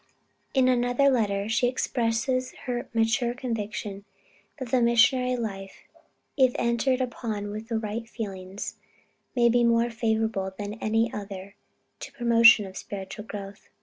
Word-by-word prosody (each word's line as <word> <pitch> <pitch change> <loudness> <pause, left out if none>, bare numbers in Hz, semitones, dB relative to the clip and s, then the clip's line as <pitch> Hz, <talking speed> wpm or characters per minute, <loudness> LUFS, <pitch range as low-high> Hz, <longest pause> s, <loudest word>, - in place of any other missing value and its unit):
In 260 -1 +4
another 245 +2 +3
letter, 205 -5 0
she 235 +2 +2
expresses 255 +1 -1
her 245 -1 -3
mature 235 +1 +1
conviction 215 -5 -4 0.5
that 260 -4 -6
the 255 - +3
missionary 250 +2 +4
life 195 -5 -6 0.5
if 260 -3 +4
entered 235 +2 +1
upon 220 -4 -3
with 215 +2 -7
right 225 0 -3
feelings 195 -4 -6 0.6
may 240 -1 +4
be 240 +1 +3
more 235 0 +3
favorable 220 -4 -1
than 205 0 -4
any 225 +1 +1
other 200 -1 -7 0.5
to - - -8
the - - -27
promotion 230 -3 +6
of 190 0 -9
spiritual 200 +2 -7
growth. 200 -1 -9
230 Hz, 135 wpm, -26 LUFS, 205-245 Hz, 0.6 s, promotion